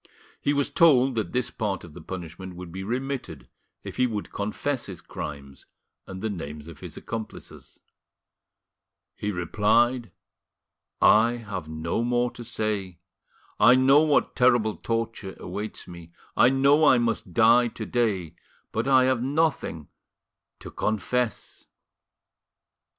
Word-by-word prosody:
He 145 - +1
was 140 -1 0
told 135 -5 +5
that 110 -2 -2
this 125 -1 0
part 100 -5 -3
of 85 - -12
his 85 - -11
punishment 90 0 -7
would 90 -1 -9
be 95 +2 -6
remitted 130 +5 -4 0.4
if - - -8
he 125 0 +3
would 105 -3 -5
confess 120 +6 -2
his 95 -4 -7
crimes 70 -4 -8 0.4
and 95 +1 -8
the 110 - 0
names 75 -4 -7
of 85 -4 -11
his - - -9
accomplices. 115 -2 -8 1.4
He 105 - -3
replied: 110 +7 +1 0.9
"I 115 +3 +6
have 100 -9 -6
no 80 +7 -2
more 120 0 +1
to 120 - -9
say. 105 -5 -3 0.6
I 115 +4 +7
know 135 +3 +6
what 155 -2 +2
terrible 120 -4 +3
torture 115 -4 -3
awaits 105 +1 -6
me, 85 -1 -12 0.2
I 125 - +6
know 140 +3 +4
I 135 -4 +6
must 115 -5 -1
die 120 +2 +5
to 110 -1 -6
day, 100 -10 -1 0.4
but 115 +4 -2
I 130 -1 +5
have 130 -2 +2
nothing 140 - -1 0.7
to - - -9
confess." 110 +2 -2
110 Hz, 135 wpm, -26 LUFS, 95-125 Hz, 1.4 s, I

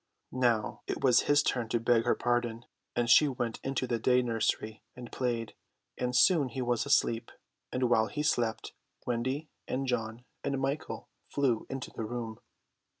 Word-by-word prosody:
Now 120 -4 +1
it - - -3
was 125 -3 +6
his 145 0 +5
turn 120 -5 -1
to 120 - +1
beg 115 0 +3
her - - +3
pardon; 120 -1 -1 0.3
and 120 -1 +1
she 150 +5 +7
went 120 -4 -3
into 135 -1 -1
the 120 -2 -1
day 125 +2 +3
nursery 110 -2 -1
and 125 -1 -9
played, 120 -4 -2 0.4
and 125 0 -2
soon 145 0 +5
he 130 - -4
was 120 +2 0
asleep; 115 -4 +2 0.4
and 125 0 +1
while 110 -2 +3
he 150 - -3
slept, 120 -6 0 0.3
Wendy 130 +5 -1 0.2
and 135 +1 -1
John 120 -1 -2 0.2
and 140 -1 -1
Michael 135 +3 -3 0.2
flew 130 -6 0
into 135 -1 -5
the - - -5
room. 115 -1 -5
120 Hz, 165 wpm, -30 LUFS, 115-130 Hz, 0.4 s, she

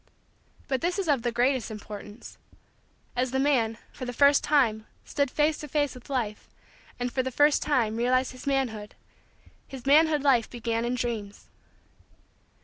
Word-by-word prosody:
But 265 -3 -1
this 350 +2 0
is 390 -3 -2
of 285 -5 +2
the 240 0 -1
greatest 245 0 +1
importance: 210 0 -9 0.8
as 250 +1 0
the 265 - -1
man, 255 -5 +2 0.2
for 260 - -8
the 245 - -4
first 280 +3 +5
time, 230 -7 +2 0.2
stood 285 -2 0
face 300 +3 +1
to 300 - -7
face 290 0 0
with 250 +1 -14
Life 230 -6 -3 0.5
and, 245 0 -2
for 260 - +1
the 260 - -3
first 290 +3 +3
time, 235 -7 +1
realized 255 +2 +1
his 255 +2 -11
manhood, 240 -7 -1 0.7
his 265 -3 -10
manhood 300 +1 +4
life 255 -5 +3
began 230 -1 -2
in 245 +1 -1
Dreams. 225 -5 -4
255 Hz, 160 wpm, -27 LUFS, 230-280 Hz, 0.8 s, first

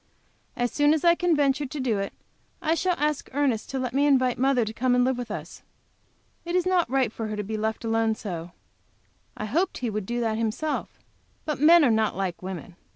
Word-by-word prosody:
As 245 -1 -1
soon 290 +4 +3
as 310 - -3
I 340 -1 +6
can 345 -1 +1
venture 285 -1 +1
to 255 -6 -1
it, 195 - -3 0.5
I 320 0 +1
shall 360 +2 +1
ask 300 -1 -1
Ernest 265 -6 0
to 270 - -3
let 255 -2 -3
me 285 +2 +3
invite 255 -4 +3
mother 260 -3 +3
to 215 - -5
come 245 +2 +1
and 250 - +4
live 260 +1 +1
with 245 -1 -6
us. 210 - -7 0.8
It 345 +1 -3
is 365 -1 +2
not 365 -2 +2
right 260 -4 +1
for 225 - -4
her 215 - -4
to 210 - -3
be 220 +2 -4
left 220 +2 -2
all 225 - -1
alone 225 -1 +2
so 175 -6 -6 0.9
I 215 - -3
hoped 335 - 0
he 240 -3 -2
would 210 -2 -4
do 240 0 -2
that 225 -2 -1
himself. 230 +8 -2 0.5
But 300 -3 -2
men 330 +1 +7
are 245 - +4
not 220 -3 +1
like 190 -3 -3
women. 180 -2 -7
250 Hz, 220 wpm, -26 LUFS, 220-295 Hz, 0.9 s, men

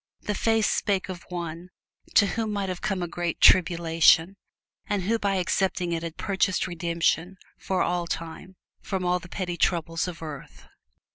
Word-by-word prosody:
The 210 - -2
face 225 +1 +2
spake 195 -2 0
of 180 -2 -8
one 170 0 -5 0.5
to - - +7
whom 220 +1 -2
might 200 -2 -2
have 180 -1 -4
come 190 -3 -1
a - - -2
great 170 -1 -3
tribulation, 170 0 +5 0.5
and 205 -2 -1
who 225 +4 +1
by 200 -2 0
accepting 180 -1 0
it 165 -1 -1
had 165 -1 -6
purchased 190 -2 0
redemption 170 +1 -1 0.2
for 190 -1 0
all 175 -1 -1
time 165 +3 -6 0.3
from 190 -2 -3
all 180 0 +2
the 175 - -13
petty 180 -2 -4
troubles 165 -1 0
of 170 -2 -7
earth. 135 - -9
180 Hz, 165 wpm, -26 LUFS, 170-190 Hz, 0.5 s, to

